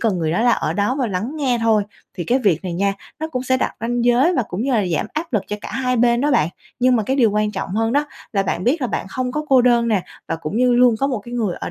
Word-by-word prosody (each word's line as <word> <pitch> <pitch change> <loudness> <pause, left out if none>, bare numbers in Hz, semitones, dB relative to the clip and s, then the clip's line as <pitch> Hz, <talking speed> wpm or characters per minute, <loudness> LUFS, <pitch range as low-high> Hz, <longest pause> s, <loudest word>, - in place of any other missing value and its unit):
cần 215 -6 +1
người 160 -2 -1
đó 180 - +1
là 240 0 +4
ở - - 0
đó 205 +6 0
và 260 - +1
lắng 205 +5 -3
nghe 260 -5 0
thôi. 220 -2 +3 0.3
Thì 175 -4 -4
cái 250 +9 +2
việc 195 - +1
này 180 - -3
nha, 195 +3 +1 0.3
nó 315 - -2
cũng 255 -5 -3
sẽ 260 0 +1
đặt - - -2
ranh 235 +1 -1
giới 250 +9 +4
và 255 - +2
cũng 185 +6 -3
như 270 - 0
là 215 -5 +2
giảm 170 -3 -1
áp 310 0 -4
lực 210 -4 +1
cho 210 - -4
cả - - -7
hai 255 -1 0
bên 235 0 +3
đó 290 +2 +1
bạn. 235 - +3 0.3
Nhưng 250 0 +4
mà 220 - +1
cái 265 +6 -1
điều 235 -5 +4
quan 210 +1 0
trọng - - -4
hơn 225 +1 +1
đó 290 +2 +1 0.3
là 200 -3 +2
bạn 185 -1 -2
biết 285 +7 +2
là 255 - 0
bạn 215 - -3
không 250 +4 -3
có 300 +2 -2
cô 260 -3 +5
đơn 235 -1 +3
nè, 205 -5 +1 0.3
và 165 - -1
cũng 165 +5 -5
như 250 +1 +3
luôn 245 -1 +5
có 275 - +2
một 260 -4 -1
cái 240 +4 -9
người 215 -7 -1
ở - - -4
240 Hz, 315 wpm, -20 LUFS, 205-255 Hz, 0.3 s, cô